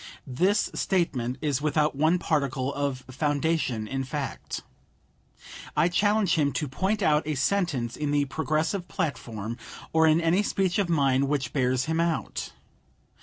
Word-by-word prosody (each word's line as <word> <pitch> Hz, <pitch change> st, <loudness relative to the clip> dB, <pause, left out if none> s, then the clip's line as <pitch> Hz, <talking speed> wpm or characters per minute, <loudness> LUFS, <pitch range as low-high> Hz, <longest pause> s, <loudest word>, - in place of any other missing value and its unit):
This 180 Hz, +11 st, +1 dB
statement 130 Hz, -10 st, 0 dB
is 145 Hz, -3 st, 0 dB
without 150 Hz, 0 st, +1 dB
one 160 Hz, +5 st, +3 dB
particle 140 Hz, -5 st, -1 dB
of 140 Hz, -2 st, -2 dB
foundation 145 Hz, -5 st, 0 dB
in 135 Hz, +3 st, -2 dB
fact. 135 Hz, +1 st, -5 dB, 1.1 s
I 170 Hz, -, +4 dB
challenge 205 Hz, 0 st, +2 dB
him 145 Hz, -4 st, +2 dB
to 150 Hz, -, -1 dB
point 195 Hz, +10 st, -1 dB
out 150 Hz, -2 st, +4 dB
a 155 Hz, -, 0 dB
sentence 135 Hz, -, 0 dB
in 150 Hz, -1 st, -2 dB
the 145 Hz, 0 st, +2 dB
Progressive 160 Hz, +5 st, -1 dB
platform 115 Hz, -, -3 dB, 0.4 s
or 160 Hz, 0 st, +5 dB
in 155 Hz, +1 st, +5 dB
any 170 Hz, +4 st, +3 dB
speech 195 Hz, -1 st, 0 dB
of 195 Hz, -4 st, 0 dB
mine 140 Hz, -4 st, +3 dB
which 135 Hz, -3 st, -1 dB
bears 130 Hz, -2 st, +1 dB
him 160 Hz, +1 st, -1 dB
out. 170 Hz, -1 st, -1 dB
150 Hz, 145 wpm, -27 LUFS, 135-170 Hz, 1.1 s, or